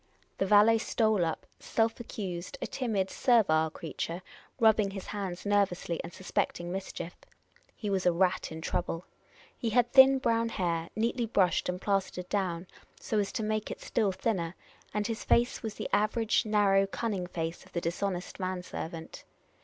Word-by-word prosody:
The 195 Hz, -, +1 dB
valet 210 Hz, +3 st, +6 dB
stole 220 Hz, -4 st, +2 dB
up, 165 Hz, -1 st, -2 dB
self 225 Hz, +1 st, 0 dB
accused, 195 Hz, 0 st, -5 dB
a -, -, -3 dB
timid, 210 Hz, -7 st, -1 dB
servile 160 Hz, -11 st, +3 dB
creature, 165 Hz, +2 st, -5 dB, 0.4 s
rubbing 220 Hz, -3 st, +5 dB
his 195 Hz, -1 st, -7 dB
hands 195 Hz, -3 st, -5 dB
nervously, 200 Hz, -4 st, +1 dB
and -, -, -7 dB
suspecting 175 Hz, -1 st, -2 dB
mischief. 180 Hz, -2 st, -5 dB, 0.6 s
He 215 Hz, -, -5 dB
was 190 Hz, -2 st, +1 dB
a -, -, +6 dB
rat 180 Hz, 0 st, +1 dB
in 160 Hz, 0 st, -6 dB
trouble. 165 Hz, +1 st, -2 dB, 0.5 s
He 230 Hz, -, -2 dB
had 240 Hz, +1 st, +2 dB
thin 265 Hz, 0 st, +9 dB
brown 230 Hz, -3 st, +1 dB
hair, 170 Hz, -5 st, -1 dB
neatly 230 Hz, +2 st, 0 dB
brushed 190 Hz, -6 st, +2 dB
and 180 Hz, 0 st, -2 dB
plastered 190 Hz, -2 st, -1 dB
down, 185 Hz, -4 st, -1 dB, 0.3 s
so 215 Hz, -, -1 dB
as 200 Hz, -, -1 dB
to 220 Hz, -, -2 dB
make 215 Hz, 0 st, -1 dB
it -, -, -6 dB
still 215 Hz, -5 st, 0 dB
thinner, 185 Hz, -3 st, -1 dB, 0.4 s
and 210 Hz, 0 st, -1 dB
his 225 Hz, 0 st, -3 dB
face 240 Hz, +1 st, +2 dB
was 220 Hz, -3 st, -4 dB
the -, -, -4 dB
average 215 Hz, +2 st, +2 dB
narrow 200 Hz, -2 st, +4 dB
cunning 195 Hz, -3 st, -2 dB
face 165 Hz, -1 st, -4 dB
of -, -, -19 dB
the 170 Hz, -, 0 dB
dishonest 180 Hz, +3 st, -3 dB
man 185 Hz, -1 st, -2 dB
servant. 165 Hz, -2 st, -7 dB
195 Hz, 165 wpm, -30 LUFS, 180-220 Hz, 0.6 s, thin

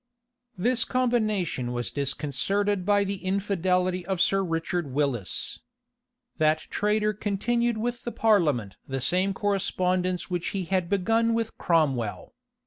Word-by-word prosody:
This 240 Hz, +5 st, +2 dB
combination 215 Hz, -, 0 dB
was 120 Hz, 0 st, -2 dB
disconcerted 170 Hz, +8 st, -1 dB
by 205 Hz, -1 st, +4 dB
the 195 Hz, -1 st, -4 dB
infidelity 185 Hz, -2 st, 0 dB
of 190 Hz, 0 st, -2 dB
Sir 195 Hz, +2 st, +3 dB
Richard 165 Hz, -1 st, -2 dB
Willis. 130 Hz, -, -1 dB, 0.8 s
That 155 Hz, 0 st, +4 dB
traitor 210 Hz, +1 st, +1 dB
continued 230 Hz, +3 st, 0 dB
with 240 Hz, +2 st, -2 dB
the 240 Hz, -, -3 dB
parliament 150 Hz, -, +2 dB
the 135 Hz, 0 st, -2 dB
same 185 Hz, +9 st, +1 dB
correspondence 185 Hz, -3 st, 0 dB
which 175 Hz, -2 st, -2 dB
he 190 Hz, -, -1 dB
had 180 Hz, -1 st, -1 dB
begun 225 Hz, +4 st, +2 dB
with 230 Hz, -1 st, -2 dB
Cromwell. 140 Hz, -, 0 dB
185 Hz, 125 wpm, -26 LUFS, 165-210 Hz, 0.8 s, by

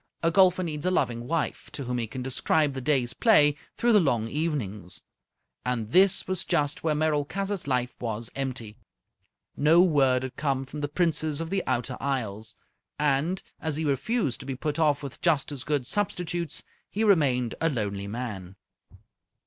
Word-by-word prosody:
A 165 Hz, -, +3 dB
golfer 185 Hz, 0 st, +5 dB
needs 155 Hz, -3 st, -4 dB
a -, -, +4 dB
loving 120 Hz, -9 st, 0 dB
wife, 165 Hz, +1 st, -2 dB
to 140 Hz, -, -4 dB
whom 125 Hz, -1 st, -2 dB
he 115 Hz, -, -2 dB
can 125 Hz, +3 st, -6 dB
describe 140 Hz, +3 st, +1 dB
the 130 Hz, -, -4 dB
day's 125 Hz, -3 st, +1 dB
play 150 Hz, -, +5 dB, 0.2 s
through 240 Hz, 0 st, +3 dB
the 210 Hz, -, +7 dB
long 120 Hz, -, +1 dB
evenings. 115 Hz, -, -3 dB, 0.6 s
And 115 Hz, -3 st, -2 dB
this 195 Hz, +3 st, +4 dB
was 185 Hz, -1 st, -2 dB
just 145 Hz, 0 st, 0 dB
where 155 Hz, -2 st, +1 dB
Merolchazzar's 155 Hz, +5 st, -1 dB
life 125 Hz, -2 st, 0 dB
was 115 Hz, -1 st, -4 dB
empty. 125 Hz, -5 st, -4 dB, 0.8 s
No 155 Hz, +4 st, +5 dB
word 135 Hz, -7 st, +3 dB
had 130 Hz, -, -5 dB
come 135 Hz, -2 st, 0 dB
from 145 Hz, +3 st, -7 dB
the 145 Hz, -, 0 dB
Princess 155 Hz, -1 st, 0 dB
of 165 Hz, +1 st, -4 dB
the 195 Hz, -1 st, +1 dB
Outer 125 Hz, 0 st, -1 dB
Isles, 110 Hz, -5 st, -2 dB, 0.4 s
and, 150 Hz, +5 st, +1 dB, 0.2 s
as 160 Hz, -2 st, -2 dB
he 160 Hz, -, -1 dB
refused 145 Hz, -, 0 dB
to 135 Hz, -, -9 dB
be 135 Hz, -, -3 dB
put 150 Hz, +3 st, -3 dB
off 150 Hz, -2 st, +2 dB
with 140 Hz, -2 st, -8 dB
just 155 Hz, -4 st, +2 dB
as 135 Hz, -3 st, -4 dB
good 145 Hz, -4 st, 0 dB
substitutes, 175 Hz, -3 st, -1 dB, 0.3 s
he 215 Hz, -, -1 dB
remained 135 Hz, -, +3 dB
a 165 Hz, -, +3 dB
lonely 100 Hz, -7 st, -3 dB
man. 100 Hz, -5 st, -5 dB
145 Hz, 175 wpm, -27 LUFS, 125-165 Hz, 0.8 s, the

